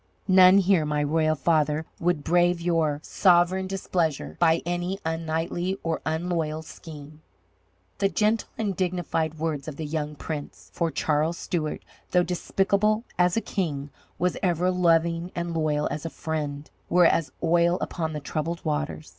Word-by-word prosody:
None 185 Hz, 0 st, +7 dB
here, 190 Hz, -4 st, +4 dB
my 150 Hz, 0 st, 0 dB
royal 155 Hz, +1 st, +2 dB
father, 155 Hz, 0 st, +1 dB
would 170 Hz, -3 st, 0 dB
brave 175 Hz, +1 st, +3 dB
your 165 Hz, -4 st, +1 dB
sovereign 185 Hz, 0 st, +3 dB
displeasure 165 Hz, -, -2 dB
by 165 Hz, 0 st, +3 dB
any 175 Hz, +2 st, -2 dB
unknightly 165 Hz, +3 st, -2 dB
or 165 Hz, -1 st, -2 dB
unloyal 160 Hz, -1 st, -1 dB
scheme." 155 Hz, -1 st, -11 dB, 0.8 s
The 195 Hz, -, +2 dB
gentle 215 Hz, +2 st, +1 dB
and 210 Hz, -4 st, -1 dB
dignified 175 Hz, -4 st, -1 dB
words 155 Hz, -3 st, -3 dB
of 155 Hz, -, -5 dB
the 155 Hz, -, -5 dB
young 150 Hz, 0 st, -3 dB
prince 150 Hz, 0 st, -7 dB
for 170 Hz, -1 st, 0 dB
Charles 155 Hz, +2 st, 0 dB
Stuart, 155 Hz, -4 st, -3 dB, 0.3 s
though 180 Hz, -1 st, +3 dB
despicable 200 Hz, +5 st, +1 dB, 0.2 s
as 180 Hz, +3 st, +3 dB
a -, -, +2 dB
king, 150 Hz, -9 st, -3 dB, 0.3 s
was 180 Hz, 0 st, 0 dB
ever 180 Hz, 0 st, +1 dB
loving 170 Hz, -1 st, +2 dB
and 170 Hz, 0 st, -3 dB
loyal 150 Hz, -2 st, 0 dB
as 150 Hz, -, -4 dB
a 165 Hz, -, -3 dB
friend 150 Hz, -2 st, -4 dB, 0.2 s
were 175 Hz, 0 st, +5 dB
as 165 Hz, -2 st, +2 dB
oil 170 Hz, +1 st, +3 dB
upon 160 Hz, -3 st, -3 dB
the 150 Hz, -, -3 dB
troubled 155 Hz, +4 st, -4 dB
waters. 155 Hz, 0 st, -2 dB
165 Hz, 150 wpm, -26 LUFS, 155-180 Hz, 0.8 s, None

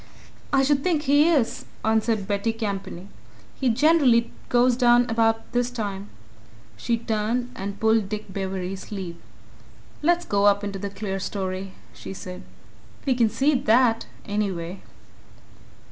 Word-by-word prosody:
"I 275 Hz, -1 st, +4 dB
should 280 Hz, 0 st, +2 dB
think 325 Hz, -5 st, +1 dB
he 290 Hz, +3 st, +4 dB
is," 280 Hz, -9 st, +1 dB, 0.2 s
answered 220 Hz, -2 st, +1 dB
Betty 205 Hz, +2 st, 0 dB
Campany. 195 Hz, -4 st, -5 dB, 0.5 s
"He 260 Hz, -, 0 dB
generally 255 Hz, -2 st, +4 dB, 0.2 s
goes 245 Hz, 0 st, +4 dB
down 240 Hz, -1 st, +4 dB
about 225 Hz, 0 st, +1 dB
this 245 Hz, 0 st, +1 dB
time." 205 Hz, -4 st, -5 dB, 0.7 s
She 235 Hz, -1 st, -1 dB
turned 230 Hz, +2 st, -1 dB
and 200 Hz, +1 st, -5 dB
pulled 220 Hz, -2 st, +2 dB
Dick 210 Hz, -2 st, -6 dB
Bewery's 190 Hz, -1 st, -3 dB
sleeve. 185 Hz, -5 st, -6 dB, 0.8 s
"Let's 345 Hz, +3 st, +2 dB
go 200 Hz, 0 st, +1 dB
up 205 Hz, 0 st, +3 dB
in 205 Hz, -, -2 dB
the 200 Hz, +1 st, -5 dB
clerestory," 195 Hz, -1 st, -4 dB, 0.2 s
she 190 Hz, -, -8 dB
said. 185 Hz, 0 st, -8 dB, 0.6 s
"We 270 Hz, -, +3 dB
can 235 Hz, -3 st, +3 dB
see 280 Hz, +7 st, +2 dB
that, 245 Hz, -3 st, +3 dB, 0.2 s
anyway." 195 Hz, -4 st, -3 dB
220 Hz, 130 wpm, -24 LUFS, 195-245 Hz, 0.8 s, I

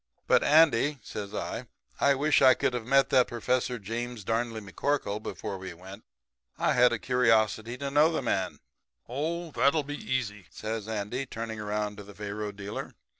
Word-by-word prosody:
But, -, -, +4 dB
Andy,' 150 Hz, -2 st, +5 dB
says 100 Hz, -1 st, -6 dB
I, -, -, -4 dB, 0.3 s
'I 140 Hz, 0 st, +4 dB
wish 145 Hz, +2 st, +3 dB
I 130 Hz, -1 st, +7 dB
could -, -, 0 dB
have 120 Hz, -2 st, -4 dB
met 135 Hz, +1 st, +4 dB
that 130 Hz, -2 st, +5 dB
Professor 125 Hz, +1 st, -1 dB
James 115 Hz, +2 st, -5 dB
Darnley 115 Hz, +2 st, -1 dB
McCorkle 105 Hz, +1 st, -2 dB
before 100 Hz, -2 st, -5 dB
we 95 Hz, -2 st, -7 dB
went. 95 Hz, +4 st, -12 dB, 0.5 s
I -, -, +2 dB
had 125 Hz, 0 st, +5 dB
a 120 Hz, -, 0 dB
curiosity 115 Hz, -1 st, +2 dB
to 140 Hz, 0 st, -4 dB
know 150 Hz, +3 st, +5 dB
that 155 Hz, -, -1 dB
man.' 95 Hz, -6 st, -1 dB, 0.5 s
"'That'll 155 Hz, +1 st, 0 dB
be 145 Hz, -, -5 dB
easy,' 105 Hz, -7 st, -2 dB
says 110 Hz, -1 st, -5 dB
Andy, 110 Hz, +5 st, -3 dB
turning 110 Hz, -2 st, -5 dB
around 105 Hz, 0 st, -2 dB
to 105 Hz, -, -8 dB
the 100 Hz, 0 st, -13 dB
faro 105 Hz, +1 st, -4 dB
dealer. 100 Hz, 0 st, -7 dB
115 Hz, 170 wpm, -28 LUFS, 105-135 Hz, 0.5 s, I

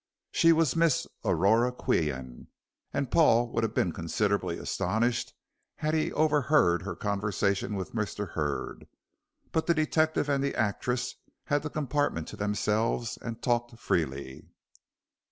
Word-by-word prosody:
She 165 Hz, -1 st, +5 dB
was 160 Hz, -4 st, +3 dB
Miss 165 Hz, -4 st, +3 dB, 0.2 s
Aurora 115 Hz, +6 st, +3 dB
Qian, 65 Hz, -, -2 dB, 0.4 s
and 140 Hz, -3 st, -2 dB
Paul 120 Hz, -8 st, +4 dB
would 115 Hz, -, 0 dB
have 110 Hz, -, -2 dB
been 90 Hz, -, +2 dB
considerably 100 Hz, +6 st, -1 dB
astonished 120 Hz, +2 st, -1 dB, 0.4 s
had 155 Hz, +1 st, -1 dB
he 160 Hz, -1 st, +1 dB
overheard 150 Hz, -, +3 dB
her 100 Hz, +2 st, -5 dB
conversation 100 Hz, 0 st, -1 dB
with 95 Hz, -2 st, -5 dB
Mr. 105 Hz, -3 st, -3 dB
Hurd. 75 Hz, -2 st, -3 dB, 0.6 s
But 160 Hz, -, 0 dB
the 170 Hz, -, +4 dB
detective 155 Hz, -1 st, +1 dB
and 140 Hz, -1 st, +1 dB
the 140 Hz, -, -1 dB
actress 125 Hz, +4 st, -1 dB, 0.3 s
had 145 Hz, -1 st, 0 dB
the 150 Hz, -, -4 dB
compartment 145 Hz, -, -1 dB
to -, -, -8 dB
themselves, 105 Hz, +3 st, 0 dB
and 115 Hz, 0 st, -6 dB
talked 120 Hz, -1 st, 0 dB
freely. 70 Hz, -, -2 dB
115 Hz, 135 wpm, -29 LUFS, 100-145 Hz, 0.6 s, She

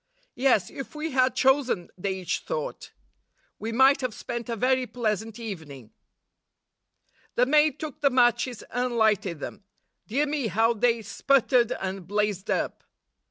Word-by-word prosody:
'Yes, 255 Hz, -7 st, +2 dB
if 275 Hz, +2 st, -8 dB
we 310 Hz, +1 st, -3 dB
had 255 Hz, 0 st, +2 dB
chosen,' 265 Hz, -, +2 dB
they 190 Hz, +1 st, -2 dB
each 185 Hz, -2 st, -2 dB
thought, -, -, -5 dB, 0.7 s
'we 220 Hz, +2 st, -4 dB
might 265 Hz, +4 st, +5 dB
have 250 Hz, -4 st, -3 dB
spent 240 Hz, -1 st, -5 dB
a 230 Hz, -, -1 dB
very 255 Hz, +2 st, +1 dB
pleasant 220 Hz, -2 st, -2 dB
evening.' 155 Hz, -, -8 dB, 1.4 s
The 250 Hz, -, +4 dB
maid 300 Hz, +2 st, +3 dB
took 305 Hz, -1 st, -7 dB
the 280 Hz, -, +5 dB
matches 245 Hz, -1 st, +2 dB
and 245 Hz, -1 st, -1 dB
lighted 205 Hz, -7 st, +2 dB
them; 195 Hz, -, -7 dB, 0.4 s
dear 275 Hz, +7 st, +1 dB
me, 290 Hz, -4 st, -1 dB
how 225 Hz, +4 st, +2 dB
they 230 Hz, 0 st, +1 dB
sputtered 255 Hz, -1 st, +2 dB
and 190 Hz, -2 st, -5 dB
blazed 205 Hz, -1 st, -1 dB
up -, -, -1 dB
240 Hz, 145 wpm, -26 LUFS, 210-265 Hz, 1.4 s, might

